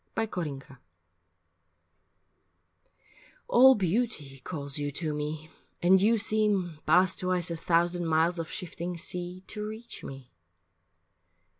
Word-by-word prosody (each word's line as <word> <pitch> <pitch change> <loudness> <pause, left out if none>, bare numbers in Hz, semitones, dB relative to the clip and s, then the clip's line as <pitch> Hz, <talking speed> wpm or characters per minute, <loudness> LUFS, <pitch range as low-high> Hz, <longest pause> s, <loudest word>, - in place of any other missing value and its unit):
IV 225 -1 -1
FROM 155 -6 -3
THE 135 - -13
SEA 135 - -15 2.7
ALL 260 +2 +7
beauty 185 - -1
calls 140 0 -5
you 145 0 -2
to 155 +2 -3
me, 150 +1 -5 0.3
and 185 +2 +5
you 225 +3 +4
seem, 205 -6 +1
Past 180 +4 +4
twice 180 -2 0
a - - -2
thousand 170 +1 +1
miles 165 +2 +2
of 165 - -4
shifting 175 -1 -5
sea, 180 +1 -5
To 210 -1 -5
reach 220 +2 -8
me. 135 -2 -9
175 Hz, 125 wpm, -28 LUFS, 155-195 Hz, 2.7 s, ALL